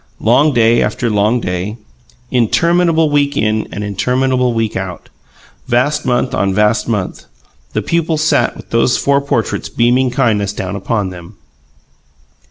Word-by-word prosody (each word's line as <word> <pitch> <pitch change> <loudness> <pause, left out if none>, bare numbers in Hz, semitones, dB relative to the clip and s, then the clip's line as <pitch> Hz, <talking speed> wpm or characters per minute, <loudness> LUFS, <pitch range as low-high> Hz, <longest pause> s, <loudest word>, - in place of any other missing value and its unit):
Long 135 +7 +3
day 115 -2 +3
after 120 -3 -1
long 105 +4 +1
day, 90 +4 -3 0.5
interminable 165 +6 +2
week 145 -1 +1
in 110 0 0
and 105 - -5
interminable 125 +5 0
week 115 -2 -2
out, 95 -1 -6 0.6
vast 140 +4 0
month 125 0 0
on 95 -1 0
vast 105 +1 +2
month, 105 -5 -3 0.5
the - - -1
pupils 165 -2 0
sat 155 - +1
with - - -13
those 115 +1 +2
four 140 0 +2
portraits 130 -5 -2
beaming 125 +2 +2
kindness 110 -6 0
down 95 -1 -4
upon 100 -1 -2
them. 90 +3 -11
115 Hz, 140 wpm, -15 LUFS, 105-135 Hz, 0.6 s, Long